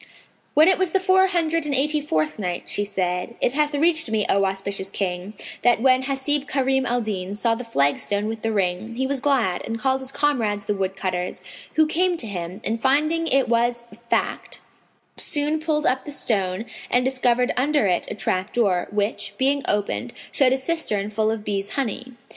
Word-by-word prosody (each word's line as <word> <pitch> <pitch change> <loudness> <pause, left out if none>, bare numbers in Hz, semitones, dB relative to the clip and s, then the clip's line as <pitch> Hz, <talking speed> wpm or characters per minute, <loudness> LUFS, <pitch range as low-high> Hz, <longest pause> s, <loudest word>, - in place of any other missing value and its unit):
When 310 +2 +7
it 375 - +4
was 370 -3 +1
the 385 - +4
Four 380 0 +4
Hundred 330 -3 0
and 285 - +1
Eighty 300 +3 +2
fourth 155 - -1
Night, 180 -3 -3
She 205 - -1
said, 185 +1 -2
It 245 - +1
hath 295 0 +1
reached 320 -2 +2
me, 220 -2 +1
O 195 0 +3
auspicious 195 0 -3
King, 190 +1 -3 0.3
that 240 -2 +4
when 255 +1 +4
Hasib 275 +2 -1
Karim 265 -1 +1
al 245 0 +1
Din 200 -3 -4
saw 230 +2 +1
the 235 +2 -4
flagstone 200 - 0
with 220 0 -4
the 225 - -1
ring, 200 +2 -1
he 260 +2 -1
was 275 0 -1
glad 250 -10 +1
and 225 - -3
called 265 +3 0
his 265 0 -3
comrades 225 -10 0
the 210 - 0
woodcutters, 190 -2 -3 0.3
who 315 - +5
came 350 +3 +1
to 245 - -4
him 185 -1 -5
and, 225 +1 -1
finding 305 +5 +2
it 270 -3 +3
was 235 +1 +1 0.3
fact, - - -1 0.6
soon 300 +1 0
pulled 305 -1 -1
up 260 +1 +1
the 295 - -6
stone 200 -6 -1 0.2
and 250 0 +2
discovered 250 -1 +2
under 285 -1 +2
it 180 -3 0
a - - -4
trap 190 -1 -1
door, 195 -7 +1
which, 205 -1 -2
being 275 +2 +2
opened, 210 +4 -1 0.2
showed 265 -3 +4
a 265 - +3
cistern 260 -9 -1
full 215 +1 +1
of 220 -1 -2
bees' 200 -1 -2
honey. 255 -1 -3
240 Hz, 190 wpm, -23 LUFS, 200-285 Hz, 0.6 s, When